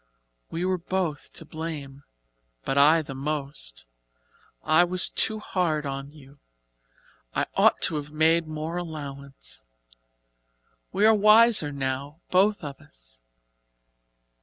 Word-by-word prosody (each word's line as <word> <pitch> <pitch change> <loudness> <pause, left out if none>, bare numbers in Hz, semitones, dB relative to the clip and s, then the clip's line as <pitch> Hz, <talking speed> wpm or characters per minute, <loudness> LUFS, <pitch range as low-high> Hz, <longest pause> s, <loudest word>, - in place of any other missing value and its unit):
"We 170 +2 -3
were 185 -1 0
both 175 -3 -3
to 165 - -11
blame 150 -4 -7 0.6
but 135 - -1
I 155 +3 +5
the 140 - -8
most. 135 - -5 0.8
I 160 +3 +5
was 180 +1 +3
too 220 - 0
hard 170 -7 -1
on 140 0 -5
you 140 -2 -17 1.0
I - - +1
ought - - +3
to 155 - +2
have 145 0 -6
made 160 +2 +2
more 155 +2 -4
allowance. 140 - -7 1.3
We 200 +2 +2
are 220 - +7
wiser 215 -5 +5
now 140 +2 -4
both 195 +1 +3
of 140 -2 -7
us. - - -18
155 Hz, 120 wpm, -26 LUFS, 140-175 Hz, 1.3 s, are